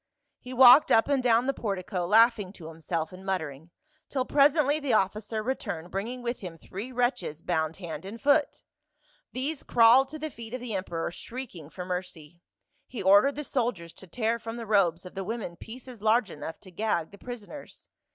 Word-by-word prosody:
He 250 Hz, -, -10 dB
walked 255 Hz, +3 st, +8 dB
up 225 Hz, -, +5 dB
and 280 Hz, -2 st, +2 dB
down 240 Hz, -1 st, +3 dB
the 275 Hz, -, +1 dB
portico, 185 Hz, -5 st, -3 dB
laughing 220 Hz, -2 st, +4 dB
to 160 Hz, -5 st, -10 dB
himself 160 Hz, +1 st, -4 dB
and 185 Hz, +1 st, -11 dB
muttering, 160 Hz, -5 st, -4 dB, 0.4 s
till 260 Hz, -2 st, -1 dB
presently 290 Hz, +1 st, +3 dB
the 280 Hz, -5 st, -1 dB
officer 215 Hz, +2 st, 0 dB
returned 200 Hz, -9 st, -4 dB
bringing 235 Hz, +6 st, -4 dB
with 240 Hz, +1 st, -3 dB
him 175 Hz, -4 st, -8 dB
three 200 Hz, +9 st, -8 dB
wretches 245 Hz, -, -1 dB
bound 160 Hz, -2 st, -1 dB
hand 175 Hz, -3 st, -7 dB
and 205 Hz, +5 st, -8 dB
foot; 285 Hz, +2 st, +2 dB, 0.7 s
these 275 Hz, +4 st, -3 dB
crawled 240 Hz, +3 st, +5 dB
to 310 Hz, -, -7 dB
the 310 Hz, 0 st, -5 dB
feet 230 Hz, 0 st, -8 dB
of -, -, -5 dB
the 245 Hz, -2 st, -5 dB
emperor 175 Hz, -4 st, -3 dB
shrieking 210 Hz, -, -8 dB
for 180 Hz, +2 st, -7 dB
mercy; 180 Hz, -3 st, -6 dB, 0.5 s
he 230 Hz, -6 st, -6 dB
ordered 205 Hz, +9 st, +5 dB
the 295 Hz, -, -4 dB
soldiers 230 Hz, -, -2 dB
to 190 Hz, -, -13 dB
tear 230 Hz, +5 st, -1 dB
from 225 Hz, +1 st, -6 dB
the 230 Hz, -, -6 dB
robes 185 Hz, -5 st, +2 dB
of 180 Hz, -, -10 dB
the 195 Hz, -, -4 dB
women 215 Hz, -3 st, -5 dB
pieces 245 Hz, +3 st, -11 dB
large 220 Hz, 0 st, +2 dB
enough 160 Hz, -, -7 dB
to 185 Hz, -, -14 dB
gag 180 Hz, -4 st, -1 dB
the 200 Hz, -, -14 dB
prisoners." 245 Hz, +3 st, -10 dB
220 Hz, 185 wpm, -28 LUFS, 180-250 Hz, 0.7 s, walked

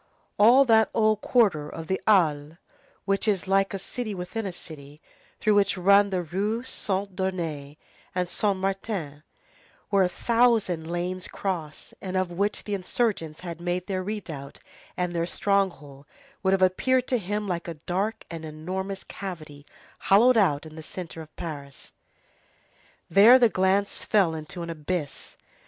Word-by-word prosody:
All 245 Hz, +6 st, +7 dB
that 220 Hz, -3 st, +4 dB
old 215 Hz, -2 st, +3 dB
quarter 195 Hz, -12 st, +2 dB
of 165 Hz, -, -7 dB
the 190 Hz, +4 st, -2 dB
Halles, 160 Hz, -6 st, +3 dB, 0.5 s
which 195 Hz, +2 st, 0 dB
is 200 Hz, -3 st, +1 dB
like 195 Hz, 0 st, +2 dB
a 195 Hz, -, -3 dB
city 215 Hz, +2 st, -5 dB
within 185 Hz, +4 st, -4 dB
a -, -, -3 dB
city, 150 Hz, -4 st, -10 dB, 0.4 s
through 215 Hz, -, +3 dB
which 200 Hz, -1 st, +2 dB
run 200 Hz, +2 st, +5 dB
the 185 Hz, -2 st, -1 dB
Rues 210 Hz, +9 st, -2 dB
Saint 195 Hz, -1 st, -2 dB
Denis 165 Hz, -7 st, -3 dB, 0.4 s
and 180 Hz, -1 st, 0 dB
Saint 200 Hz, +2 st, 0 dB
Martin, 190 Hz, -6 st, -3 dB, 0.7 s
where 200 Hz, -1 st, +4 dB
a 180 Hz, -, +3 dB
thousand 225 Hz, -8 st, +1 dB
lanes 180 Hz, +1 st, -3 dB
cross, 170 Hz, -6 st, -5 dB
and 185 Hz, -1 st, -3 dB
of 185 Hz, -1 st, 0 dB
which 200 Hz, +4 st, -1 dB
the 205 Hz, -, -4 dB
insurgents 190 Hz, -5 st, -1 dB
had 170 Hz, -2 st, -7 dB
made 175 Hz, +1 st, -2 dB
their 190 Hz, -1 st, -2 dB
redoubt 170 Hz, -9 st, -6 dB, 0.4 s
and 180 Hz, -1 st, -1 dB
their 170 Hz, 0 st, -1 dB
stronghold, 170 Hz, -9 st, -1 dB, 0.3 s
would 190 Hz, 0 st, +2 dB
have 190 Hz, -1 st, +3 dB
appeared 255 Hz, +8 st, +2 dB
to 250 Hz, -, +2 dB
him 205 Hz, +2 st, -3 dB
like 175 Hz, -2 st, -3 dB
a 170 Hz, -, -5 dB
dark 185 Hz, +8 st, -3 dB
and 165 Hz, -1 st, -6 dB
enormous 185 Hz, +5 st, -5 dB
cavity 155 Hz, -7 st, -8 dB, 0.3 s
hollowed 235 Hz, +6 st, +5 dB
out 165 Hz, -9 st, +2 dB
in 155 Hz, 0 st, -11 dB
the 160 Hz, -, -8 dB
centre 165 Hz, 0 st, -7 dB
of 155 Hz, -1 st, -14 dB
Paris. 140 Hz, -4 st, -8 dB, 1.1 s
There 210 Hz, +8 st, +8 dB
the 240 Hz, -3 st, +5 dB
glance 195 Hz, +1 st, +1 dB
fell 195 Hz, -6 st, +3 dB
into 160 Hz, +2 st, -6 dB
an 170 Hz, -, -5 dB
abyss. 155 Hz, -2 st, -4 dB
185 Hz, 155 wpm, -26 LUFS, 165-205 Hz, 1.1 s, There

